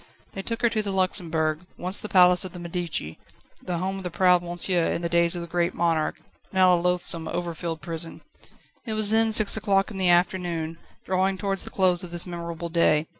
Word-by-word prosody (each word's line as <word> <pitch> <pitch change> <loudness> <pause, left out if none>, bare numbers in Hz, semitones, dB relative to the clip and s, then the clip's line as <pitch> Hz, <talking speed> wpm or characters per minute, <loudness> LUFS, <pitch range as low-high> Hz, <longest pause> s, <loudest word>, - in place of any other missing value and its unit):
They 195 - -6
took 230 +4 -5
her 235 - +5
to 220 - 0
the 205 - -4
Luxembourg, 165 -5 +1 0.2
once 185 +2 0
the 215 - -7
palace 180 -1 +5
of 185 -1 -8
the - - -8
Medici, 170 - -4 0.4
the 175 -1 -3
home 190 +2 -3
of 180 - -5
proud 180 0 +3
"Monsieur" 175 0 0
in 170 - -3
the 170 - -1
days 170 0 +3
of 175 - -4
the - - -8
Great 170 +1 -1
Monarch, 165 -2 0 0.3
now 185 -1 +4
a - - +4
loathsome, 175 -2 +1
overfilled 170 -2 -4
prison. 165 +1 -4 0.6
It 225 - -4
was 215 -1 +4
then 225 0 +3
six 215 -1 +2
o'clock 195 -1 +1
in 200 - -7
the 185 -2 +2
afternoon, 175 -2 0 0.3
drawing 190 +1 0
towards 195 -1 -2
the - - -6
close 185 -1 +2
of 180 - -8
this 175 0 -1
memorable 170 -1 -6
day. 160 -2 +2
175 Hz, 205 wpm, -25 LUFS, 170-190 Hz, 0.6 s, her